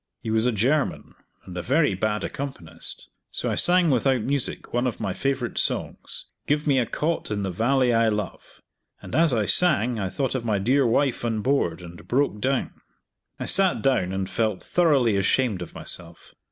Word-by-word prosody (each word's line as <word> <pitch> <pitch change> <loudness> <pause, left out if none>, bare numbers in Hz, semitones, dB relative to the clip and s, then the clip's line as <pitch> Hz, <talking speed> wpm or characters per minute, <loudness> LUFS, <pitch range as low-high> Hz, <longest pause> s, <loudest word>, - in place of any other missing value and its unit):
He 110 - -3
was 110 +2 +2
a - - +2
German, 130 +8 0 0.3
and 90 - -10
a 90 - -3
very 140 - +2
bad 105 +3 -1
accompanist; 85 -13 -3 0.2
so - - -2
I - - 0
sang 175 -2 +4
without 130 0 +2
music 140 +1 -3
one 120 +2 +1
of 120 - -4
my 95 - -2
favorite 135 -1 -2
songs, - - -2 0.2
"Give 150 +1 +1
me 140 -3 +3
a 120 - 0
Cot 160 +7 -2
in 105 -1 -2
the 95 - -2
Valley 120 +6 +2
I 115 0 +3
Love," 105 -1 -5 0.4
and - - -11
as 165 -1 +4
I 110 -4 +1
sang 125 - +2
I 95 -2 -2
thought 125 +7 -2
of 130 -3 -2
my 110 -3 0
dear 125 +7 +2
wife 130 +2 +1
on 115 -2 -1
board, 100 -10 0
and 85 0 -12
broke 125 -4 0
down. 135 +1 -1 0.6
I - - -3
sat 190 -1 +3
down 130 -10 +1
and 95 0 -2
felt 110 -3 -1
thoroughly 140 - +2
ashamed 100 0 +1
of 90 - -8
myself. 85 -2 -8
120 Hz, 190 wpm, -24 LUFS, 100-140 Hz, 0.6 s, sang